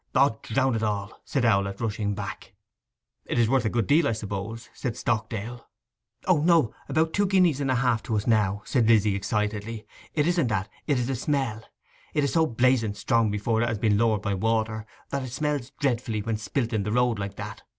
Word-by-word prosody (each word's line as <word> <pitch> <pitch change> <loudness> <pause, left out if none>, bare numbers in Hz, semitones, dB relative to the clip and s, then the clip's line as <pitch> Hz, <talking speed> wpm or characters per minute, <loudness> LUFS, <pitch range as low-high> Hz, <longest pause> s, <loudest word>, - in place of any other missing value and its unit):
''Od 130 -4 +3
drown 130 +3 +1
it 110 - -1
all!' 105 -2 -3
said 135 - -1
Owlett, 100 -3 +2
rushing 105 -2 -1
back. 100 -1 -7 0.7
'It - - -2
is 115 -2 +4
worth 130 0 +2
a - - +2
good 115 -1 0
deal, 150 - +4
I - - +1
suppose?' 110 +2 -5
said 120 -2 -4
Stockdale. 115 0 -3 0.6
'O 180 -5 +4
no—about 160 0 +2
two 205 0 +2
guineas 180 -7 +3
and 135 - 0
half 125 -3 +2
to 115 - -1
us 105 - -1
now,' 105 -3 +2
said 120 -5 +2
Lizzy 110 -3 +4
excitedly. 105 +2 -2 0.3
'It 150 -2 +2
isn't 170 -5 +2
that—it 110 +7 -2
is 125 - 0
the 135 - -1
smell! 130 -4 -1 0.5
It 150 - +2
is 140 - 0
so 160 -1 +3
blazing 120 -3 +2
strong 110 +2 +2
before 105 +2 0
it 120 - +2
has 115 - -1
been 105 -1 +2
lowered 110 -3 +2
by 100 - 0
water, 110 +1 -1 0.2
that 140 - -1
it 130 -2 -6
smells 145 -2 -1
dreadfully 120 -5 0
when 110 0 -1
spilt 115 +2 -2
in 110 - +1
the 105 +1 -2
road 120 -2 +2
like 100 0 -4
that! - - -7
115 Hz, 200 wpm, -26 LUFS, 105-130 Hz, 0.7 s, is